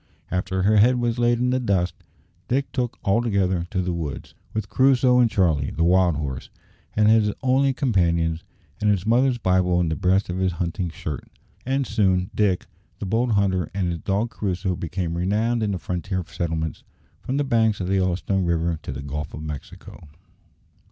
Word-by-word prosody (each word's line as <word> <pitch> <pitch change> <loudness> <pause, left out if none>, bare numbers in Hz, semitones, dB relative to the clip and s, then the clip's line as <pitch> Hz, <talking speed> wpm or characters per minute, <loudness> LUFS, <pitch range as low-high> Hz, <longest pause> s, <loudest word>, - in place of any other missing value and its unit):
After 95 0 -1
her 105 +2 +4
head 125 +4 +5
was 120 0 -1
laid 120 0 +3
in 125 +1 +1
the 130 - +1
dust, 95 -7 0 0.5
Dick 135 +3 0
took 125 -3 -2
altogether 100 -5 +1
to 95 -3 -1
the 90 0 -1
woods, 80 -5 -5 0.2
with 110 -2 -3
Crusoe 130 0 +4
and 120 -2 +5
Charlie, 80 -9 +1
the 80 - -1
wild 90 -1 +4
horse, 70 -3 -4 0.5
as 105 - +3
his 110 -1 +4
only 135 +1 +3
companions, 85 - +1 0.4
and 105 - +2
his 100 -2 +1
mother's 125 +3 +3
Bible 90 -4 +2
in 85 -2 +1
the 80 - -1
breast 95 +5 +2
of 90 +1 -3
his 95 -1 +1
hunting 85 +2 -2
shirt. 75 -3 -6 0.4
And 135 +1 +1
soon 95 -5 +1
Dick, 100 -4 +1 0.3
the - - -5
bold 115 +4 +1
hunter, 95 -4 +1
and 95 -3 0
his 85 -1 -3
dog 105 +6 -1
Crusoe 95 -2 -2
became 85 0 -3
renowned 110 +7 0
in 105 - 0
the 95 - -1
frontier 90 +1 -3
settlements 80 -2 -3 0.4
from 130 - -2
the 145 - +2
banks 115 -5 +2
of 95 - -2
the 95 - -1
Yellowstone 95 +1 0
River 85 -1 0
to - - -6
the - - -6
Gulf 75 +1 -5
of 75 - -7
Mexico. 75 +1 -9
95 Hz, 185 wpm, -23 LUFS, 85-115 Hz, 0.5 s, head